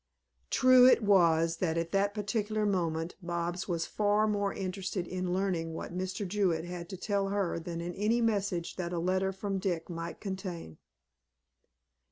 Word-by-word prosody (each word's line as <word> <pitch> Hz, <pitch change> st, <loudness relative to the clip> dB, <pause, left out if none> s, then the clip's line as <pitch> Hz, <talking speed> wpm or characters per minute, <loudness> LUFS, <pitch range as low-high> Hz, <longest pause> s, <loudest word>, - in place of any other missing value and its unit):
True 255 Hz, -1 st, +7 dB
it 245 Hz, -, +5 dB
was 165 Hz, -4 st, +4 dB
that 165 Hz, -2 st, 0 dB
at 165 Hz, 0 st, -2 dB
that 200 Hz, +1 st, +1 dB
particular 215 Hz, 0 st, -1 dB
moment 170 Hz, -4 st, -1 dB
Bobs 175 Hz, +1 st, -3 dB
was 170 Hz, -2 st, -1 dB
far 210 Hz, +1 st, +2 dB
more 205 Hz, -2 st, 0 dB
interested 190 Hz, -1 st, -3 dB
in 185 Hz, 0 st, -3 dB
learning 180 Hz, -4 st, -1 dB
what 175 Hz, -, -6 dB
Mr. 185 Hz, +2 st, -3 dB
Jewett 180 Hz, -4 st, 0 dB
had 175 Hz, -1 st, -7 dB
to 190 Hz, -, -6 dB
tell 200 Hz, +1 st, 0 dB
her 195 Hz, -4 st, -1 dB
than 170 Hz, 0 st, -5 dB
in 175 Hz, +1 st, -4 dB
any 215 Hz, +5 st, +1 dB
message 200 Hz, -6 st, -1 dB
that 175 Hz, -1 st, -3 dB
a -, -, -1 dB
letter 185 Hz, +3 st, +1 dB
from 195 Hz, 0 st, -3 dB
Dick 180 Hz, -3 st, -2 dB
might 165 Hz, 0 st, -5 dB
contain. 185 Hz, -, -6 dB
185 Hz, 165 wpm, -31 LUFS, 170-205 Hz, -, True